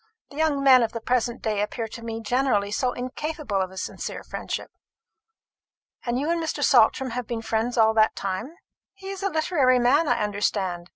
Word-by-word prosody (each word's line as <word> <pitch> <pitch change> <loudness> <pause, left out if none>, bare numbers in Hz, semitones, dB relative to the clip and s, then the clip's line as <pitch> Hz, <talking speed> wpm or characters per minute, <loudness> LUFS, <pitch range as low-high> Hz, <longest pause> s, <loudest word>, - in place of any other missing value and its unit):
The 280 - -11
young 305 -3 +1
men 260 -2 +7
of 230 - -1
the 230 - -3
present 240 +1 -1
day 215 -2 0
appear 225 +2 -3
to 230 - -9
me 225 0 -5
generally 225 -3 +1
so 250 +4 0
incapable 255 -3 -3
of 185 - -2
a 190 - -13
sincere - - -5
friendship. - - -5 1.3
And 240 0 -1
you 300 +4 0
and 340 0 0
Mr. 305 -2 -2
Saltram 255 0 +4
have 245 -1 -4
been 230 -1 -4
friends 225 +2 -1
all 220 -1 +5
that 220 0 +3
time? 200 - -4 0.4
He 390 0 -9
is 390 -1 -7
a 395 - 0
literary 310 -6 +2
man, 270 +6 +3
I - - +1
understand. 195 -4 -2
240 Hz, 190 wpm, -25 LUFS, 220-280 Hz, 1.3 s, men